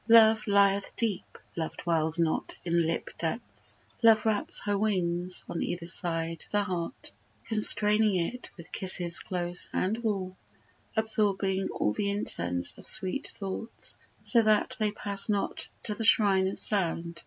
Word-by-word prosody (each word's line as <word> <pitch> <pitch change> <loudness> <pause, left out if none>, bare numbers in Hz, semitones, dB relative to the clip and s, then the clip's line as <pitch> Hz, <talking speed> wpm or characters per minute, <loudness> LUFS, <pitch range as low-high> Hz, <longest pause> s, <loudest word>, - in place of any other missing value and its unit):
Love 220 -1 +4
lieth 200 -1 0
deep; 220 -6 -3 0.2
Love 160 -1 -6
dwells 160 -1 -1
not 165 -2 -3
in 170 -1 -1
lip 165 - -4
depths: 200 +9 +1 0.2
Love 225 -2 +3
wraps 215 -2 +2
her 205 0 -2
wings 180 -3 0
on 170 - -6
either 175 -1 -5
side 165 -2 -1
the 205 0 0
heart, 180 -4 -7 0.3
Constraining 210 -1 +2
it 185 +8 -5
with 170 -1 -14
kisses 180 -2 +5
close 175 -1 -1
and 190 +4 -3
warm, 195 -5 -5 0.6
Absorbing 200 -3 0
all 105 - -3
the 200 - -3
incense 90 - +1
of - - -6
sweet 195 +9 +3
thoughts 195 +3 -5 0.3
So 235 - +4
that 215 +3 +2
they 215 -1 -1
pass 205 0 +1
not 205 -1 -3
to 210 - -1
the 225 - -7
shrine 195 -4 +5
of 190 - -5
sound. 170 -4 +1
195 Hz, 145 wpm, -26 LUFS, 170-215 Hz, 0.6 s, kisses